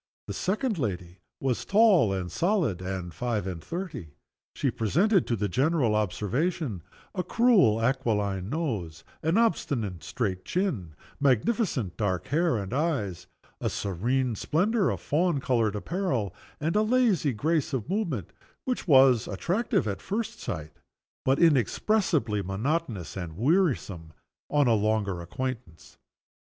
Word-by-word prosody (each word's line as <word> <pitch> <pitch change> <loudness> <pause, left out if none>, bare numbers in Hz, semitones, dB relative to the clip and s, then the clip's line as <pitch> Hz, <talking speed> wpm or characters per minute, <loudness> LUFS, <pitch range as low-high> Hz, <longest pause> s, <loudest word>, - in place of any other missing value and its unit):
The - - -5
second 210 - -1
lady 90 -6 -3 0.2
was 130 -3 -1
tall, 200 - +5
and 90 -3 -3
solid, 170 - +1
and 90 -2 -4
five 115 -1 -2
and 90 -4 -5
thirty. 165 - -6 0.4
She - - 0
presented 175 - +2
to 120 - +1
the 105 -1 -1
general 135 - +2
observation 110 - -1 0.3
a 185 - -2
cruel 190 - +4
aquiline 105 -6 0
nose, 110 - -3 0.2
an 160 +5 +1
obstinate 120 - 0
straight 95 -6 -2
chin, 125 - -2 0.2
magnificent 140 - +1
dark 95 -5 -1
hair 160 -1 +2
and 100 +2 -4
eyes, 105 - -1 0.3
a - - -1
serene 120 +7 -1
splendor 190 - +1
of - - -2
fawn 165 0 +1
colored 115 -6 +1
apparel, 130 - -2 0.3
and 160 +4 -1
a 210 - +4
lazy 215 - +2
grace 155 +7 0
of 130 -4 -2
movement 165 - -2 0.3
which 250 -6 -2
was 130 - +6
attractive 175 - 0
at 100 -2 -3
first 225 +3 -3
sight, 75 0 -5 0.5
but 135 +1 +3
inexpressibly 150 - +2
monotonous 110 - -2
and 85 -4 -6
wearisome 120 - +1 0.4
on 145 -1 +3
a 120 - +4
longer 105 -4 0
acquaintance. 110 -2 -6
130 Hz, 130 wpm, -27 LUFS, -, 0.5 s, was